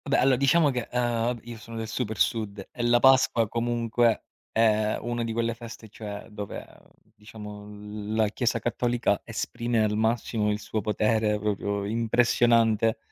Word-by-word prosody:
Ah - - -6
beh, 140 - +3
allora 130 0 +4
diciamo 140 +4 +4
che, 125 -2 -3
uhm, 120 -1 0
io 120 0 -8
sono 115 +1 -9
del 110 0 -4
super 110 -1 -3
Sud 100 -2 -1
e 120 - -6
la 120 0 +4
Pasqua 130 -3 +4
comunque 115 0 +1 0.3
è 110 -1 +2
una 120 0 -3
di 115 - -3
quelle 115 0 0
feste, 115 -1 -10
cioè 105 -1 -7
dove, 105 -1 -6
ehm, - - -21 0.3
diciamo 105 -1 -10 0.5
la 110 -1 +3
Chiesa 120 +2 0
cattolica 120 -2 0
esprime 115 0 -1
al 105 0 0
massimo 110 -1 0
il 105 0 -1
suo 110 0 -3
potere, 110 +1 +1
proprio 100 -1 -2
impressionante, 115 0 +3
115 Hz, 160 wpm, -26 LUFS, 105-120 Hz, 0.5 s, allora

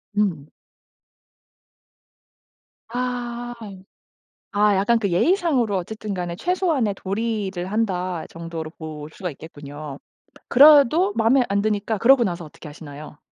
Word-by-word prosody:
음. 180 -9 0 2.4
아. 240 0 -3 1.0
아 205 0 +3
약간 210 +5 +2
그 200 -4 -1
예의상으로 260 - +2
어쨌든 210 +3 -5
간에 175 -2 -4
'최소한의 315 - 0
도리를 195 -3 -3
한다.' 185 -6 -1
정도로 165 -1 -6
볼 155 -2 -8
수가 180 -4 -5
있겠군요. 145 -1 -9 0.5
그래도 300 +7 +6
마음에 240 +4 +4
안 200 0 +1
드니까 215 +1 -1
그러고 245 +3 +5
나서 175 -2 -3
어떻게 150 +1 -13
하시나요? 150 -1 -10
205 Hz, 255 characters per minute, -22 LUFS, 170-240 Hz, 2.4 s, 그래도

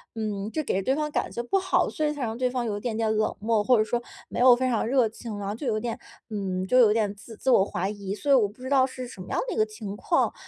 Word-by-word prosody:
嗯 210 -2 -3
就 310 - -2
给 195 -8 0
对 260 +8 +1
方 300 0 -2
感 - - -1
觉 235 - -4
不 390 +11 +1
好， 375 - +2
所 310 - -3
以 300 - +2
才 295 -3 -4
让 225 -1 -2
对 250 +1 0
方 250 -1 -2
有 210 -3 -2
一 - - -5
点 220 0 -3
点 220 -1 +1
冷 215 0 0
漠， 220 0 +1
或 250 +2 +4
者 215 - +4
说 235 +2 -1 0.3
没 - - -4
有 250 0 +8
非 255 +1 0
常 235 -4 +1
热 250 -1 +3
情。 220 -1 -7
然 200 -1 -4
后 200 - -2
就 245 +5 -5
有 215 -2 +1
点 230 +1 -4 0.3
嗯 190 -3 -2
就 250 +7 +4
有 225 -4 +7
点 210 -2 +1
自 210 +3 -12
自 260 - +1
我 195 - +6
怀 190 -1 -2
疑， 200 -1 -4
所 285 +6 -1
以 - - +8
我 225 -6 +4
不 220 +5 -15
知 - - -5
道 270 -2 +5
是 255 -1 -4
什 220 -6 -10
么 185 - -10
样 - - 0
的 - - -2
一 - - -5
个 - - +5
情 215 -2 -6
况， 335 - +1
225 Hz, 340 characters per minute, -26 LUFS, 210-255 Hz, 0.3 s, 有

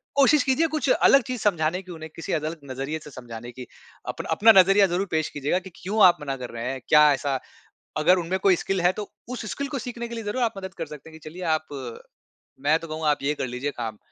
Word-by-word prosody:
कोशिश 280 0 +5
कीजिए 280 +5 +2
कुछ 305 -3 -2
अलग 275 +1 +5
चीज़ 250 -2 -5
समझाने 175 -2 +1
की, 185 -1 -12
उन्हें 160 -1 -8
किसी 165 - -4
अलग 155 +1 -2
नज़रिये 135 +4 -4
से 150 - -10
समझाने 120 -1 -9
की, 125 +1 -10 0.4
अपना - - -5
अपना 220 +8 +6
नज़रिया 195 +1 +4
ज़रूर 190 +2 0
पेश 155 -1 0
कीजिएगा 145 +6 -1
कि, 190 - -11
क्यों 205 +3 0
आप 175 -1 +6
मना 135 -2 -3
कर 125 -1 -7
रहे 115 +1 -5
हैं? 135 - -5
क्या 150 -1 +7
ऐसा 135 -1 -1 0.6
अगर 175 +5 +4
उनमें 180 +3 -2
कोई 190 -2 +4
स्किल 195 -2 -1
है 180 +1 +4
तो 205 - -6 0.2
उस 250 -3 -5
स्किल 280 0 -3
को 275 - -1
सीखने 235 0 -5
के 235 - -6
लिए 225 - -5
ज़रूर 240 +5 -1
आप 230 - 0
मदद 190 -1 -7
कर - - -3
सकते 150 +1 -11
हैं 160 0 -13
कि 155 - -10
चलिए 180 +3 -10
आप 155 0 -5 0.9
मैं 150 +3 +3
तो 165 - -9
कहूँगा 155 0 -1
आप 145 - 0
ये 150 +2 +1
कर 130 - -3
लीजिए 125 +4 -3
काम 110 -3 -4
165 Hz, 245 wpm, -25 LUFS, 145-205 Hz, 0.9 s, क्या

